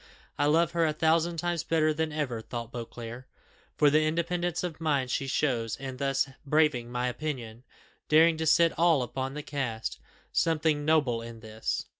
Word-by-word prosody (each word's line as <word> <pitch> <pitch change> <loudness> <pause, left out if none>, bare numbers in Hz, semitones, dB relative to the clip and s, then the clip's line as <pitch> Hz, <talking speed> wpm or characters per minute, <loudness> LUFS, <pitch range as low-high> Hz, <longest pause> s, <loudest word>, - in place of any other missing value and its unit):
"I 145 - +1
love 165 +2 +3
her 170 -1 +1
a 155 - 0
thousand 165 +2 +2
times 175 0 -1
better 155 -1 +2
than 160 +1 -1
ever," 140 -7 -2
thought 115 +1 -6
Beauclerc, 120 +1 -7 0.5
"for 145 -1 +5
the 155 +1 +4
independence 170 +2 -1
of 165 -3 -5
mind 140 -5 0
she 135 - -1
shows 120 -5 0
in 130 -1 -7
thus 135 0 +1 0.2
braving 145 -5 +2
my 125 0 -1
opinion, 125 -4 -5 0.5
daring 160 +2 +6
to 160 0 -1
set 165 +1 +5
all 165 -6 +4
upon 130 +2 -4
the 150 - -5
cast 120 -7 -3 0.3
something 155 -2 +1
noble 145 -7 +2
in 115 -1 -9
this! 110 0 -3
150 Hz, 170 wpm, -28 LUFS, 125-160 Hz, 0.5 s, daring